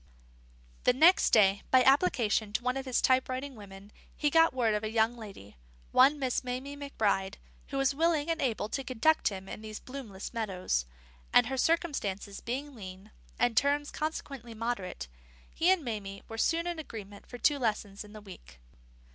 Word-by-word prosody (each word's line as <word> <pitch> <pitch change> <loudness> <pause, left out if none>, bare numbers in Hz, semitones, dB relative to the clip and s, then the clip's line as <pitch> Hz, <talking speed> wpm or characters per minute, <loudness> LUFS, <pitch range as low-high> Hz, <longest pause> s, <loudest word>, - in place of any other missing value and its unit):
The 250 - +5
next 330 +8 +5
day, 200 -2 +4
by 255 -1 +6
application 235 - +2
to 240 - -1
one 250 +1 0
of 270 0 -4
his 255 - 0
type 260 0 +3
writing 265 +2 -4
women, 200 -2 -12 0.3
he 295 -1 +1
got 325 +1 +5
word 240 -4 +1
of 210 +1 -1
a 215 - -2
young 225 +1 +2
lady, 195 - -11 0.3
one 275 +4 +6
Miss 260 -3 -1
Mamie 255 +3 -4
McBride, 215 -8 -1 0.3
who 275 - -4
was 270 0 +2
willing 320 0 +1
and 330 -1 -1
able 230 -5 0
to 270 - -3
conduct 265 +6 +2
him 190 -2 -4
in - - -7
these 215 -1 -7
bloomless 245 -8 -8
meadows; 185 - -1 0.4
and, - - +6
her 265 +3 -3
circumstances 245 - -1
being 275 +5 -4
lean, 195 -2 -10 0.3
and 245 -1 +2
terms 285 +3 +2
consequently 275 -6 -5
moderate, 215 - -4 0.5
he 340 - +2
and 375 -6 +3
Mamie 200 -4 -5
were 225 - -7
soon 335 +6 +1
in 345 -2 -3
agreement 205 -8 -9
for 245 - -8
two 285 +3 +2
lessons 210 -4 -2
in 210 - -14
the 215 - -10
week. 185 - -13
245 Hz, 180 wpm, -30 LUFS, 210-280 Hz, 0.5 s, by